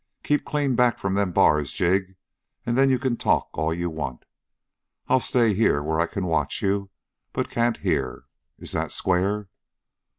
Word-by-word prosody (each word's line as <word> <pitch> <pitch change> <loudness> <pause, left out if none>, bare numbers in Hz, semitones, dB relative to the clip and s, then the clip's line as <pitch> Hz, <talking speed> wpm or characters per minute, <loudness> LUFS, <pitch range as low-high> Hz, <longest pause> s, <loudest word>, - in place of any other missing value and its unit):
Keep 150 0 +1
clean 145 -3 0
back 125 -1 +3
from 95 -1 -2
them 100 -2 +1
bars, 75 -4 +3
Jig, 95 +1 0 0.5
and 120 - 0
then 135 +1 +4
you 130 - +3
can 130 -2 -1
talk - - +1
all 80 +1 -1
you 85 +1 -2
want. 75 -6 -5 0.8
I'll 130 - +4
stay 115 -3 +2
here 95 -8 +2
where 80 +1 -1
I 85 - +2
can 95 +1 -4
watch 80 -3 -1
you 100 0 0 0.4
but - - -2
can't 120 0 +1
hear. - - -2 0.3
Is - - -8
that - - -2
square?" 95 +3 0
95 Hz, 170 wpm, -24 LUFS, 85-120 Hz, 0.8 s, then